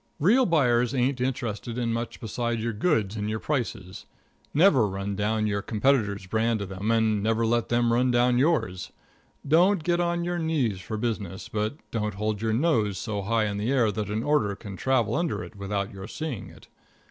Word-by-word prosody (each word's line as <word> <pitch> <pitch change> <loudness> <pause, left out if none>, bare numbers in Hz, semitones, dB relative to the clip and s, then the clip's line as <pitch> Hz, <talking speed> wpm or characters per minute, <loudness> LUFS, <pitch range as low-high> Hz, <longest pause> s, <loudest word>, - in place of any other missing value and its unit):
Real 225 - +4
buyers 125 -7 +2
ain't 130 0 +1
interested 120 -3 -3
in 120 -2 0
much 115 +1 -4
besides 120 0 -2
your 115 -1 -1
goods 110 - +1
and 105 0 -2
your 110 - -1
prices. 110 -8 -4 0.4
Never 145 - +5
run 100 +1 -4
down 110 +2 0
your 100 -1 0
competitor's 105 -3 +1
brand 110 +4 +1
to 100 - -4
them, 95 +3 -4
and 110 -2 +2
never 115 +2 +1
let 120 +1 +1
them 120 0 +2
run 125 +2 +3
down 120 0 +3
yours. 130 - 0 0.6
Don't 175 +4 +4
get 175 +1 +1
on 175 0 0
your 175 0 -2
knees 140 - 0
for 110 +4 -5
business, 105 -5 -3
but 105 +4 -2 0.2
don't 105 -3 -2
hold 105 0 -2
your 110 0 0
nose 110 - +1
so 105 0 -3
high 110 +2 +1
in 100 -1 -2
the 110 +5 -1
air 120 -6 +3
that 105 -1 -4
an 110 +2 -2
order 135 -9 +1
can 100 -1 -9
travel 130 0 +1
under 170 -1 -1
it 110 - -11
without 100 0 -3
your 95 0 -8
seeing 135 -4 -5
it. - - -16
115 Hz, 195 wpm, -26 LUFS, 105-130 Hz, 0.6 s, Never